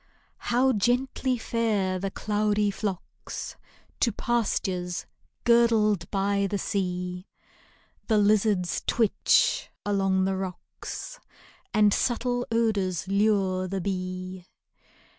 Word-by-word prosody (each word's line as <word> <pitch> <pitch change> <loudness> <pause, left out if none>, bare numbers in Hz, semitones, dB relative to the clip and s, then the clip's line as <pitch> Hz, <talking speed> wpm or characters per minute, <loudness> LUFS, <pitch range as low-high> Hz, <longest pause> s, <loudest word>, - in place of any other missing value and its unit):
How 255 +2 +3
gently 250 +3 +1
fare 215 -5 0
the 195 +1 -2
cloudy 210 0 0
flocks 195 -3 -5 0.4
To 235 - +3
pastures 190 -6 -1 0.4
girdled 220 -6 +3
by 200 0 +1
the 205 - -1
seal 180 -2 -2 0.8
The 220 - +3
lizards 205 -3 +2
twitch 235 - +2 0.2
along 195 -2 +2
the 190 0 0
rocks, 190 - -7 0.5
And 210 -1 +4
subtle 245 0 0
odors 200 -7 0
lure 195 -2 +2
the 195 +1 -3
bee. 185 -1 -4
200 Hz, 95 wpm, -27 LUFS, 185-225 Hz, 0.8 s, And